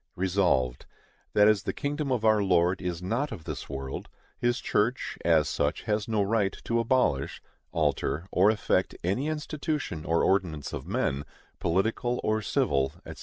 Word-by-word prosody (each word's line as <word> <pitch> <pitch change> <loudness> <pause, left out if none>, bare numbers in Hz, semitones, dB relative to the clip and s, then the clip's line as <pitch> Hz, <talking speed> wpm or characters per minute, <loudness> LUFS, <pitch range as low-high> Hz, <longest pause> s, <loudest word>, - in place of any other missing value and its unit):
Resolved, 90 -10 +1 0.5
That 105 0 +6
as 105 -2 +4
the - - -3
kingdom 145 0 -2
of 120 -3 0
our 110 -1 +5
Lord 90 -1 +2
is 90 -1 -3
not 120 +10 -1
of 95 -8 -7
this - - -6
world, 70 -1 -5 0.3
His 120 +1 +1
church, 115 +5 0
as 80 -3 +4
such, 75 +2 -1
has 105 -1 -1
no 110 -3 +1
right 100 -1 +1
to 115 0 0
abolish, 115 - +1 0.3
alter, 80 +5 0
or 95 +3 +5
affect 105 -3 +1
any 100 - 0
institution 150 - -3
or 85 +1 +1
ordinance 90 -7 0
of 65 - -5
men, 95 - 0 0.4
political 110 +7 0
or 110 0 +1
civil, 70 -8 +1
&c. - - -7
100 Hz, 160 wpm, -28 LUFS, 85-115 Hz, 0.5 s, That